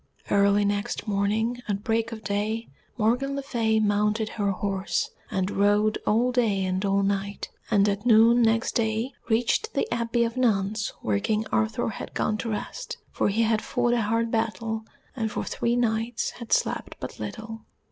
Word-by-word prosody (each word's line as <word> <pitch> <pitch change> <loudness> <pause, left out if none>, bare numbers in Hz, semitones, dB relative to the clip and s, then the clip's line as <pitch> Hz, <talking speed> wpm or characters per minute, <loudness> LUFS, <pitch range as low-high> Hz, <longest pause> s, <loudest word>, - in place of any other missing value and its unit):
Early 200 0 +4
next 205 +3 -2
morning 215 +4 0
at 200 -1 -2
break 225 +1 0
of 220 -1 -7
day 210 +3 -2 0.3
Morgan 250 +5 +1
le 280 - -3
Fay 225 -5 +1
mounted 210 +1 +1
her 205 -2 -1
horse 195 0 -1 0.2
and 190 +1 -1
rode 205 +2 +2
all 235 +4 +3
day 215 -6 +1
and 185 +1 -1
all 200 0 +2
night, 200 0 -2 0.2
and 200 0 +4
at 200 0 -1
noon 235 0 +6
next 225 0 +2
day 225 +2 0 0.2
reached 235 - +1
the - - +1
Abbey 235 0 +1
of 230 +1 -2
nuns 215 -3 +1
where 100 -2 +1
King 215 - 0
Arthur 225 +1 +1
had 215 - -7
gone 215 0 0
to 230 - -3
rest, 225 - -5
for - - +1
he 220 +3 +2
had 220 -1 +2
fought 240 - 0
a 240 - +2
hard 230 +2 0
battle, 225 0 -1 0.3
and 225 -4 -1
for - - -2
three 235 0 -1
nights 230 0 0
had 235 -2 -10
slept - - 0
but - - -7
little. 225 -1 -6
220 Hz, 175 wpm, -26 LUFS, 205-230 Hz, 0.3 s, noon